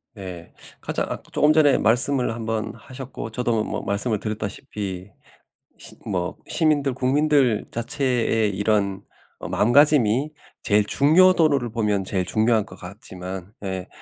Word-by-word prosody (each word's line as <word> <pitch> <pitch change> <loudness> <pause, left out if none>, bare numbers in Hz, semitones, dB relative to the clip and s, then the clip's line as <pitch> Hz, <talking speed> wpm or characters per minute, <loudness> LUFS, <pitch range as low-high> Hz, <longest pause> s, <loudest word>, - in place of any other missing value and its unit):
네 90 -4 -9 0.3
가장 - - -3
아 - - -3
쪼금 150 +1 +3
전에 150 -3 +4
말씀을 125 +2 +3
한번 115 -1 -3
하셨고 125 0 -9
저도 115 -2 0
뭐 - - -4
말씀을 105 +2 -1
드렸다시피 105 -3 -5 0.7
시 - - -10
뭐 90 -3 -3
시민들 145 -5 +1
국민들 135 -3 +2
자체의 120 -4 0
이런 100 -1 0 0.4
어 - - -7
마음가짐이 135 +2 +3 0.3
제일 105 0 +2
중요도로 160 - +4
를 120 -3 -4
보면 105 -4 0
제일 95 -1 -1
중요할 110 +2 +1
것 95 - -13
같지만 95 0 -8
예 95 -2 -4
110 Hz, 280 characters per minute, -23 LUFS, 100-135 Hz, 0.7 s, 전에